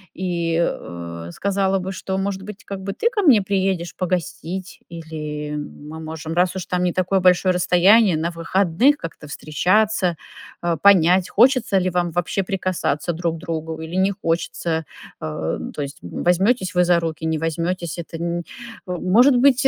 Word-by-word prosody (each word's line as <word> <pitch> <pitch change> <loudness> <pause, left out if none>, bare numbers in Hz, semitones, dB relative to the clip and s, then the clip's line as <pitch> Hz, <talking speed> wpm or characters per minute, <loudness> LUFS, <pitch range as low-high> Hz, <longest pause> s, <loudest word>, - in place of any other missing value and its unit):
и, 170 -3 -1
э, 85 - -4
сказала 195 - 0
бы, 190 0 -4
что, 190 0 -4
может 195 0 -2
быть, 210 +1 -10
как 195 -1 -6
бы 195 +1 -4
ты 460 - 0
ко 435 -4 0
мне 255 - +5
приедешь 190 -3 -1
погостить, 185 0 -3
или 150 -3 -6
мы 150 +1 -8
можем, 160 0 -6
раз 180 +2 +2
уж 190 - -4
там 180 0 -1
не 180 - +2
такое 185 +2 +1
большое 185 0 +4
расстояние, 180 +2 +4
на 165 +2 -1
выходных 185 - +2
как-то 165 - -8
встречаться, 180 +5 +1 0.5
э, 170 -1 +1
понять, 185 -2 +5
хочется 245 -3 +4
ли 185 -1 +1
вам 175 0 0
вообще 175 +3 -1
прикасаться 180 -4 -1
друг 165 0 -2
к - - -11
другу 160 -1 -4
или 160 +1 -7
не 190 +1 +3
хочется. 165 -3 -2 0.4
Э, 80 +1 -3
то 145 - -3
есть 140 +1 -8
возьмётесь 185 - +1
вы 180 0 +4
за 175 -1 +4
руки, 160 -1 -4
не 160 0 0
возьмётесь- 165 +2 -2
это 165 0 -7
н 170 +1 -2
э, - - -3 0.5
может 225 +9 +4
быть, 270 +1 +5
180 Hz, 170 wpm, -21 LUFS, 165-190 Hz, 0.5 s, мне